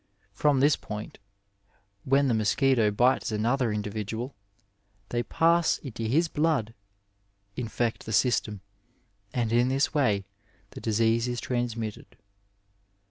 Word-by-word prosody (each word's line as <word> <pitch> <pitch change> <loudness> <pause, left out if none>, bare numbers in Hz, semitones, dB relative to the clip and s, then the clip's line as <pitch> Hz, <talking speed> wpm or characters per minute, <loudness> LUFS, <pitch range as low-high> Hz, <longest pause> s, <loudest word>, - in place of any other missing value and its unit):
From 145 -3 +2
this 145 +1 +5
point, 105 0 -8 0.9
when 135 +1 +3
the 125 - +2
mosquito 110 +2 +2
bites 120 +4 +2
another 115 +3 +1
in 105 0 -2
dividual, 110 +5 -4 0.8
they 120 - 0
pass 165 +6 +2
into 115 -5 -6
his 160 +9 +2
blood, 150 -8 0 0.8
infect 115 -1 -2
the - - -4
Bjstem, 105 -2 +1 0.7
and 115 -2 -1
in 120 +1 +4
this 135 +3 +1
way 105 -10 +1 0.5
the - - -9
disease 115 +2 +1
is 120 -1 -2
transmitted. 115 -3 -4
120 Hz, 120 wpm, -27 LUFS, 110-135 Hz, 0.9 s, this